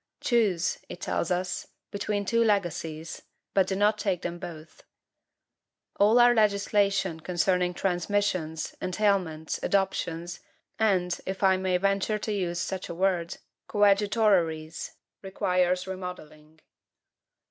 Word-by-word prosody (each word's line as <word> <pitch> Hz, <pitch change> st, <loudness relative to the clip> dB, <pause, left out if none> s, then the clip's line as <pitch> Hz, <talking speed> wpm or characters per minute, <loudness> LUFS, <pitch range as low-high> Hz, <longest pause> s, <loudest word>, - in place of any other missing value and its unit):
"Choose," 205 Hz, -8 st, +1 dB
it 175 Hz, -, -8 dB
tells 170 Hz, -, -1 dB
us, 180 Hz, 0 st, -2 dB, 0.2 s
"between 205 Hz, 0 st, -2 dB
two 230 Hz, +3 st, +2 dB
legacies, 165 Hz, -6 st, -1 dB, 0.3 s
but 190 Hz, -2 st, +3 dB
do 190 Hz, -, -1 dB
not 210 Hz, +2 st, +2 dB
take 190 Hz, -4 st, -1 dB
them 175 Hz, 0 st, -4 dB
both." 165 Hz, -3 st, -10 dB, 1.2 s
All 210 Hz, +4 st, +5 dB
our 240 Hz, 0 st, +7 dB
legislation 200 Hz, -4 st, +2 dB
concerning 180 Hz, +1 st, 0 dB
transmissions, 175 Hz, -4 st, -1 dB
entailments, 185 Hz, -5 st, 0 dB
adoptions, 175 Hz, -3 st, -1 dB, 0.4 s
and, 180 Hz, -5 st, +1 dB
if 190 Hz, +1 st, -4 dB
I 190 Hz, -1 st, +5 dB
may 185 Hz, -1 st, +1 dB
venture 195 Hz, +3 st, +1 dB
to 215 Hz, 0 st, -3 dB
use 175 Hz, -4 st, -2 dB
such 190 Hz, +2 st, -4 dB
a 170 Hz, -, -5 dB
word, 180 Hz, -1 st, 0 dB, 0.3 s
COADJUTORERIES, 200 Hz, -6 st, +2 dB, 0.3 s
requires 185 Hz, -1 st, 0 dB
remodelling. 160 Hz, -5 st, -8 dB
185 Hz, 115 wpm, -27 LUFS, 175-200 Hz, 1.2 s, our